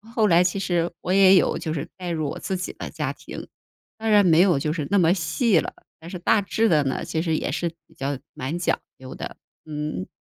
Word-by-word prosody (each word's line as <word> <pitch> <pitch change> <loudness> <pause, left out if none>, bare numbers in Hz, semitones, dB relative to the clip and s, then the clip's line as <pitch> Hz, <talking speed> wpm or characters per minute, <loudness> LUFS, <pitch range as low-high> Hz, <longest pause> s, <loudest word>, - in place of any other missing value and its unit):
后 220 -2 +4
来 175 0 +5
其 180 +2 0
实 175 -2 0
我 180 - -3
也 195 -1 +7
有 180 - +3
就 155 - -3
是 155 0 -4
带 180 -1 -5
入 155 -4 -1
我 - - -6
自 190 - -3
己 185 - -4
的 - - -7
家 - - -3
庭， - - -9 0.5
当 220 0 -2
然 205 -2 +6
没 165 -1 +5
有 180 -6 +4
就 150 +2 -1
是 150 -5 -3
那 200 - +3
么 170 -1 +4
细 195 - +2
了。 - - -4 0.3
但 165 +1 -10
是 180 - -5
大 200 +4 +2
致 220 +3 +1
的 150 -3 +4
呢， 130 - -1
其 160 - -2
实 165 -2 0
也 - - -2
是 175 - -1 0.2
比 - - -24
较 135 0 -2 0.2
蛮 140 +7 -4
讲 175 - 0 0.2
究 130 0 -10
的， - - -7 0.3
嗯。 150 -10 -4
170 Hz, 260 characters per minute, -24 LUFS, 155-190 Hz, 0.5 s, 也